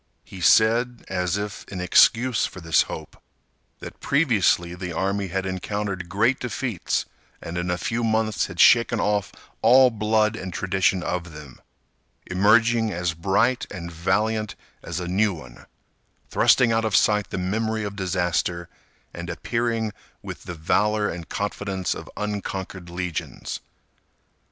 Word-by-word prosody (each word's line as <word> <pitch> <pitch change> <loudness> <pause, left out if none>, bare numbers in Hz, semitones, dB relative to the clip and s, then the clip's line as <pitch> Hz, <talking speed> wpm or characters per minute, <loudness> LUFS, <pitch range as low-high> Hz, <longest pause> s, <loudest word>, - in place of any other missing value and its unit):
He 95 - -11
said, 115 +6 +3
as 90 +1 -1
if 105 -1 -5
in 95 - -6
excuse 115 +7 +4
for - - -11
this 80 -2 +3
hope, - - -8 0.6
that - - -9
previously 110 - +2
the 90 0 -6
army 95 +3 -1
had 95 +1 -3
encountered 95 -1 -3
great 115 +8 +2
defeats 125 -4 -2 0.3
and 85 - -7
in 90 0 -2
a 90 - 0
few 115 +7 -2
months 110 -1 +1
had 85 - -10
shaken 115 -1 +5
off 105 -1 0 0.3
all 125 +3 +6
blood 110 0 +1
and 95 -4 -6
tradition 95 0 0
of 90 -2 -3
them, 75 -4 -12 0.6
emerging 110 +4 +3
as 90 -2 -1
bright 100 +9 +1
and 85 -3 -7
valiant 105 +6 -1 0.3
as 80 +1 -5
a 90 - -4
new 100 +2 +1
one; 65 -6 -13 0.6
thrusting 120 -2 +4
out 115 0 +1
of 110 -3 0
sight 105 0 +3
the - - -4
memory 110 +4 -1
of 100 -1 -5
disaster, 90 -2 -1 0.4
and 85 0 -7
appearing 115 +4 -1 0.3
with - - -8
the 85 - -6
valor 105 +6 +1
and 85 -1 -7
confidence 100 -3 -2
of - - -9
unconquered 95 -3 -4
legions. 90 -1 -5
100 Hz, 140 wpm, -24 LUFS, 90-110 Hz, 0.6 s, all